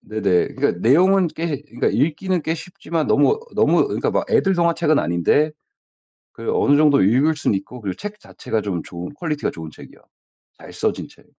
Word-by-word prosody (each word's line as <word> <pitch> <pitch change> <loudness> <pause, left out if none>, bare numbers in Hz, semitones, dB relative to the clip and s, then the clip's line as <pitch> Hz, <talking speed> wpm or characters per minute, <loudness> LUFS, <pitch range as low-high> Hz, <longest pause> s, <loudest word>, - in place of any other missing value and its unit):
네네. 100 -5 0
그러니까 - - +1
내용은 180 - +4
꽤 155 -4 -3
그니까 125 -5 -2
읽기는 165 +6 0
꽤 160 - -1
쉽지만 170 -2 -4
너무 440 +1 +3
너무 - - +3
그니까 - - -1
막 - - 0
애들 195 -1 +3
동화책은 170 -3 +2
아닌데 85 - +1 0.8
그 115 - -5
어느 145 0 +3
정도 150 -2 +4
읽을 135 +10 +3
수는 145 - 0
있고 120 +6 -10
그리고 95 -3 -4
책 210 +1 -7
자체가 110 - -4
좀 95 -5 -3
좋은 90 +7 -8
퀄리티가 150 -1 -3
좋은 80 -1 -8
책이요. - - -14 0.6
잘 - - -13
써진 - - -2
책. - - -21
150 Hz, 375 characters per minute, -20 LUFS, 110-170 Hz, 0.8 s, 내용은